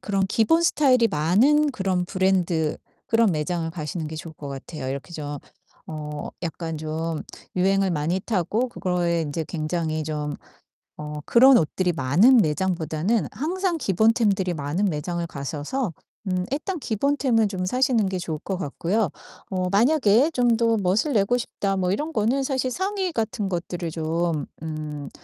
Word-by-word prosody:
그런 195 -2 0
기본 280 +12 +3
스타일이 255 -8 +4
많은 240 - +3
그런 190 -5 0
브랜드 180 -4 +1 0.3
그런 225 -2 +3
매장을 165 +2 -2
가시는 160 0 -4
게 160 - -7
좋을 160 0 -8
것 145 -2 -8
같아요. 135 0 -6
이렇게 140 +5 -5
좀 145 -2 -5 0.5
어 150 -1 -6
약간 165 -1 -4
좀 160 +1 -3 0.4
유행을 195 +1 +2
많이 165 +3 0
타고 220 +5 0
그거에 175 -4 0
인제 155 +1 -3
굉장히 155 -1 -2
좀 150 -1 -3 0.6
어 150 0 -6
그런 255 +1 +7
옷들이 175 +3 +1
많은 170 - +5
매장보다는 170 +1 +1
항상 345 - -1
기본 220 +2 +3
템들이 200 -6 +1
많은 155 +6 -1
매장을 170 0 -2
가셔서 155 - -3 0.3
음 185 -1 0
일단 350 +6 -2
기본 280 +5 0
템은 225 -7 +2
좀 185 -2 -3
사시는 250 -1 +2
게 190 -1 -2
좋을 160 -3 -3
것 195 - -2
같고요. 185 +5 -1 0.4
어 185 -1 -1
만약에 245 +3 +4
'좀 245 -3 +3
더 230 -1 +2
멋을 210 - +1
내고 215 +3 +3
싶다.' 200 -4 -2
뭐 180 -1 +1
이런 300 +11 -2
거는 245 +5 +1
사실 260 -1 0
상의 380 +3 -1
같은 220 -4 -2
것들을 175 -1 -3
좀 165 0 -1 0.2
음 150 -3 -5
185 Hz, 305 characters per minute, -24 LUFS, 160-230 Hz, 0.6 s, 그런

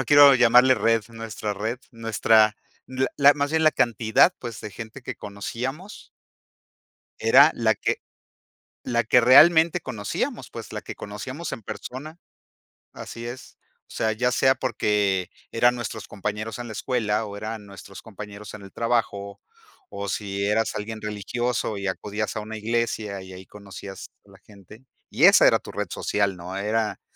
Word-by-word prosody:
no 135 - -1
quiero 145 0 +8
llamarle 125 +2 +6
red, 115 -1 +2
nuestra 115 -2 -5
red 110 +5 -3
nuestra 110 -2 +3 0.3
la 130 0 -1
la 145 0 +6
más 145 0 -1
bien 160 0 +1
la 155 - +7
cantidad, 115 - +3
pues, 120 -3 -7
de 105 - -7
gente 115 +6 -9
que - - -5
conocíamos. 125 - -6 1.1
Era - - +7
la - - +2
que - - -1 0.9
la 120 0 0
que 120 +2 +4
realmente 160 +7 +6
conocíamos, 110 -7 -4
pues, - - -9
la - - -5
que - - -8
conocíamos 130 +10 -7
en 115 - -6
persona 150 - -8 0.8
así 115 0 -8
es, 120 +2 -9 0.3
o - - -17
sea, 110 -1 0
ya 125 +3 0
sea 130 +2 +3
porque, 105 -7 0 0.2
eran 120 +2 +3
nuestros 115 -2 -6
compañeros 105 +2 -4
en 120 - -6
la 110 - -7
escuela, 110 -2 -1
o, 100 -1 -8
eran 110 0 -6
nuestros 100 0 -12
compañeros 105 -1 -10
en 110 - -9
el 95 -1 -12
trabajo, 110 -4 -2 0.5
o 100 0 -6
si 100 0 -3
eras 110 +2 +1
alguien 110 +1 -5
religioso 110 +1 -2
y 100 0 -4
acudías 105 +3 -3
a - - -1
una 110 +1 -7
iglesia, 110 -3 -2
y 95 0 -11
ahí 95 0 -11
conocías 100 -1 -10 0.2
a 100 - -20
la 95 - -17
gente. 105 +4 -17 0.2
Y - - +3
esa - - +7
era - - +4
tu - - -11
red - - -3
social, 100 -2 -1
¿no? 90 +2 -7
Era 105 +2 -1
110 Hz, 165 wpm, -24 LUFS, 105-125 Hz, 1.1 s, quiero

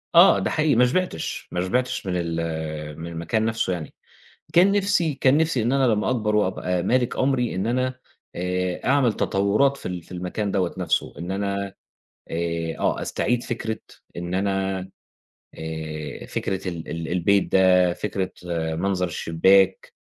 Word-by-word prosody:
آه 175 +3 +8
ده - - -1
حقيقي 155 -3 +2
ما 125 +2 +6
شبعتش، 180 - -2
ما 90 - -1
شبعتش 125 +4 -1
من 90 - -1
ال 80 -3 -3
من 85 - -6
المكان 85 +7 -1
نفسّه 115 -5 0
يعني. 80 -3 -6 0.6
كان 185 +3 +6
نفسي 195 -6 +2
كان 135 +1 +3
نفسي 160 -7 +2
إن 120 +3 +1
أنا 135 -2 +3
لمّا 105 - 0
أكبر 105 -4 0
وأبقى 90 -3 0
مالك 125 +3 +1
أمري 130 -5 +1
إن 95 +4 -1
أنا 130 +1 -1 0.4
آآ 90 0 -2
أعمل 130 -4 +3
تطورات 105 +11 +2
في - - -13
ال 90 -2 -5
في - - -19
المكان 90 +3 -3
دوّة 95 -3 0
نفسّه - - 0
إن 85 +2 -5
أنا 100 0 -2 0.6
آآ 85 0 -2
آه - - 0
استعيد 120 0 0
فكرة 110 -2 -3 0.4
إن 85 +1 -4
أنا 95 0 0 0.8
آآ 80 -2 -6
فكرة 95 -1 -3
ال 85 -2 -6
ال 85 -1 -4
البيت 95 +3 +2
ده 90 -2 +5
فكرة 95 -3 -3 0.4
منظر 90 +1 0
الشباك 95 +4 +3
95 Hz, 155 wpm, -24 LUFS, 85-120 Hz, 0.8 s, آه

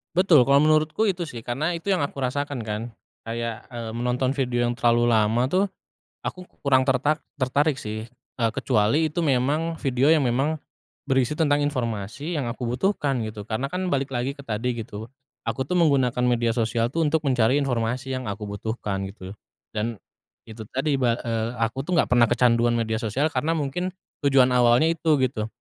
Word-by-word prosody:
Betul, 175 -7 +6
kalau 140 +3 +4
menurutku 155 +7 +3
itu 180 -3 0
sih, 150 -7 -7
karena 135 +9 -2
itu 170 +3 -6
yang 185 -7 +2
aku 140 0 -4
rasakan 140 +1 -2
kan. 105 0 -2 0.4
Kayak, 115 0 -4
eee, 115 -2 -5
menonton 125 +2 0
video 125 -3 -1
yang 120 - -1
terlalu 120 -1 +3
lama 110 +1 +3
tuh 185 +6 +2 0.6
aku 185 - -4 0.2
kurang 130 -1 +5
terta 135 +3 +2 0.2
tertarik 140 +2 +1
sih, 110 +1 -6
eee, 115 -1 -3
kecuali 120 +6 +2
itu 155 +3 -2
memang 150 +4 +1
video 135 +2 +2
yang 155 -5 +4
memang 135 +6 0 0.5
berisi 135 +2 +1
tentang 145 -2 +3
informasi 125 - -3
yang 135 -6 -2
aku 120 +1 -4
butuhkan 135 - 0
gitu. 110 -1 -6
Karena 125 +6 -2
kan 185 0 -2
balik 140 -4 -1
lagi 130 +2 -2
ke 140 - -12
tadi 120 +1 -2
gitu, 110 -1 -7 0.4
aku 115 +4 -1
tuh 180 +7 -1
menggunakan 130 -6 +3
media 120 -1 +2
sosial 115 0 0
tuh 165 +3 +1
untuk 155 +1 +1
mencari 125 -3 +2
informasi 125 +1 -1
yang 130 -1 -3
aku 100 +1 -5
butuhkan 100 -2 -3
gitu. 95 -1 -9 0.4
Dan 115 +2 -2 0.5
itu 110 -1 -10
tadi, 135 +1 +1
ba 120 -3 +2
eee, 115 -1 -1
aku 115 +4 -2
tuh 180 - -1
enggak 170 - +2
pernah 120 -1 +5
kecanduan 120 0 +3
media 110 -1 0
sosial 130 +7 0
karena 155 +4 0
mungkin 165 +5 -2 0.3
tujuan 135 -2 +5
awalnya 125 +5 +4
itu, 160 -4 +1
gitu. 110 -4 0
125 Hz, 180 wpm, -24 LUFS, 115-145 Hz, 0.6 s, Betul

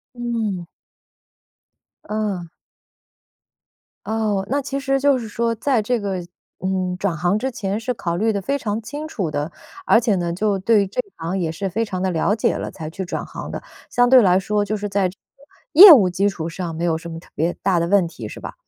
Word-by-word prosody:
嗯。 225 -7 -3 1.4
嗯。 205 -5 -2 1.6
哦， 215 -3 0
那 285 +2 +1
其 275 0 -4
实 270 -1 0
就 280 -1 +3
是 230 - -6
说 230 +2 -1
在 250 +1 +1
这 235 +3 0
个， 195 -3 -3 0.4
嗯， 185 -1 -1
转 195 -4 -1
行 175 +6 +1
之 265 +4 -2
前 205 -3 -3
是 250 +2 -2
考 170 -6 -3
虑 220 +4 +1
得 200 - -1
非 280 +7 -1
常 215 -3 -2
清 290 +7 -6
楚 195 - -3
的， 145 +2 -3 0.4
而 230 - +6
且 225 -3 +1
呢 175 -1 -1
就 200 +2 0
对 205 +2 +3
于 - - -1
这 200 +6 -2
一 200 - -9
行 170 +3 -3
也 170 -3 -1
是 190 +4 -4
非 225 +5 0
常 185 -3 -4
地 190 - +1
了 180 +4 +1
解 220 - +1
了， - - -4
才 155 -1 -7
去 190 - -6
转 - - -4
行 - - -8
的。 - - -6 0.3
相 245 0 +3
对 260 -1 +9
来 185 -3 +4
说， 205 +2 0
就 215 +1 -2
是 205 0 -4
在 195 -2 +1
这 180 - -11 0.2
个 275 - -24 0.4
业 400 -1 +14
务 210 - +8
基 195 +3 +1
础 170 -5 -4
上 170 -1 -5
没 165 +2 -3
有 160 -2 +1
什 170 +1 -9
么 165 - -6
特 - - -16
别 165 +3 0
大 190 -2 +2
的 170 - 0
问 190 -1 +3
题， 165 - -8
是 - - -9
吧？ - - -7
200 Hz, 240 characters per minute, -21 LUFS, 180-230 Hz, 1.6 s, 业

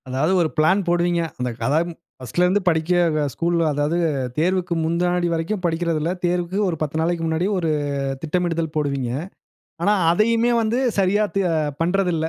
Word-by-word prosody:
அதாவது 135 +7 0
ஒரு 160 - +1
பிளான் 185 +5 +3
போடுவீங்க. 175 0 +1 0.2
அந்த 125 0 -1
கதம் 160 +5 +1 0.3
பர்ஸ்ட்ல 175 +8 0
இருந்து 190 +3 +2
படிக்க 160 -2 +1
ஸ்கூல் 170 +5 0 0.2
அதாவது 145 +3 0 0.4
தேர்வுக்கு 180 +1 +1
முன்னாடி 175 +1 +1
வரைக்கும் 165 +5 -2
படிக்கிறதில்ல. 165 -1 0
தேர்வுக்கு 175 +1 -1
ஒரு 170 - -2
10 155 +1 -2
நாளைக்கு 170 0 -1
முன்னாடி 160 +2 0
ஒரு, 165 -3 0 0.5
திட்டமிடுதல் 165 -1 -1
போடுவீங்க. 140 -5 -1 0.7
ஆனா 205 - +3 0.2
அதயுமே 230 +5 +2
வந்து 225 +2 0 0.2
சரியா 200 +2 +3
தே 195 - +3 0.4
பண்றதில்ல. 175 -2 +1
170 Hz, 140 wpm, -22 LUFS, 160-180 Hz, 0.7 s, பிளான்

